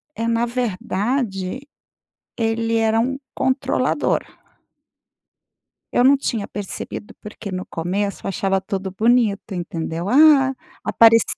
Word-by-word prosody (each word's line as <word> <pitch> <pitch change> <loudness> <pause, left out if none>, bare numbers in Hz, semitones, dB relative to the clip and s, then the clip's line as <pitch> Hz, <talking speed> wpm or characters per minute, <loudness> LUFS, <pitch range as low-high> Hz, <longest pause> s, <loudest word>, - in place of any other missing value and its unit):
é, 230 - -2
na 230 0 +1
verdade, 230 -1 -2 0.8
ele 225 0 0
era 225 0 +2
um 265 +4 0 0.2
controlador. 260 +1 +1 1.7
Eu 245 - +3
não 275 +2 +7
tinha 225 -6 -2
percebido, 205 0 -6
porque 210 -1 -8
no 185 0 -4
começo 195 +5 -3
achava 195 0 0
tudo 190 0 -4
bonito, 220 0 +1
entendeu, 170 -1 -4
ah, 275 0 +6 0.3
apareci 230 0 +6
225 Hz, 105 wpm, -21 LUFS, 195-245 Hz, 1.7 s, não